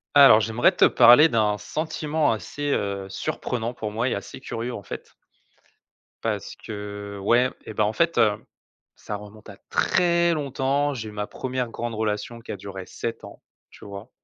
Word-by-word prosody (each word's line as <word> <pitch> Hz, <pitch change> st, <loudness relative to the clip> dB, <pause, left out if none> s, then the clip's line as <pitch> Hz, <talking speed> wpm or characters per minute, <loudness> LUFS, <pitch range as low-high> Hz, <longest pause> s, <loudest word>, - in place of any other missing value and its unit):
Alors, 135 Hz, -6 st, +9 dB
j'aimerais 115 Hz, -, +3 dB
te -, -, +3 dB
parler 125 Hz, +6 st, +7 dB
d'un 105 Hz, -3 st, +2 dB
sentiment 155 Hz, -1 st, -1 dB
assez, 145 Hz, +6 st, -3 dB
heu, 100 Hz, -1 st, -2 dB
surprenant 120 Hz, +4 st, -3 dB
pour 110 Hz, -3 st, -5 dB
moi 115 Hz, +4 st, 0 dB
et -, -, -1 dB
assez 100 Hz, -, -7 dB
curieux, 120 Hz, +2 st, -4 dB
en 105 Hz, -, -6 dB
fait -, -, -8 dB, 1.1 s
parce -, -, -3 dB
que 100 Hz, -1 st, -7 dB
ouais 120 Hz, +5 st, +3 dB, 0.2 s
et -, -, -7 dB
ben, 105 Hz, -, +1 dB
en 105 Hz, +1 st, 0 dB
fait, 170 Hz, +4 st, +1 dB
heu, 105 Hz, -2 st, +3 dB, 0.5 s
ça 105 Hz, -, -6 dB
remonte 105 Hz, +1 st, -11 dB
à -, -, -11 dB
très 170 Hz, -1 st, +2 dB
longtemps, 140 Hz, -1 st, 0 dB
j'ai 110 Hz, -3 st, -5 dB
eu -, -, -10 dB
ma 105 Hz, 0 st, -4 dB
1re 130 Hz, -2 st, -3 dB
grande 120 Hz, 0 st, -4 dB
relation 110 Hz, +2 st, -2 dB
qui 115 Hz, -, -8 dB
a -, -, -5 dB
duré 95 Hz, -1 st, -8 dB
7 115 Hz, -, -5 dB
ans, -, -, -12 dB, 0.3 s
tu -, -, -15 dB
vois? 100 Hz, +3 st, -9 dB
115 Hz, 175 wpm, -24 LUFS, 105-135 Hz, 1.1 s, Alors